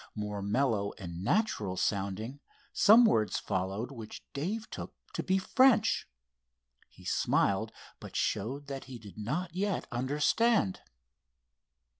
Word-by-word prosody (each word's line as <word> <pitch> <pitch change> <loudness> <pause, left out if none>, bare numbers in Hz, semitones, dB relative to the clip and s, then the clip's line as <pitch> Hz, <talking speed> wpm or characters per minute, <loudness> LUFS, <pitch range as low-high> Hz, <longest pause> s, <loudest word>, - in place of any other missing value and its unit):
More 105 -1 -3
mellow 105 -1 +1
and 85 -2 -7
natural 105 - 0
sounding, 100 +8 -2 0.3
some 220 +3 +7
words 110 - +2
followed 95 +7 -2
which 115 -5 -9
Dave 200 +11 -3
took - - -7 0.2
to - - -1
be 190 0 +1
French. 230 +3 +4 0.8
He - - -17
smiled, - - +1 0.3
but - - -10
showed 130 +8 -1
that 135 -1 -6
he 130 -1 -8
did 105 -4 -12
not 165 - -3
yet 200 0 -1
understand. 145 - +2
125 Hz, 120 wpm, -31 LUFS, -, 0.8 s, some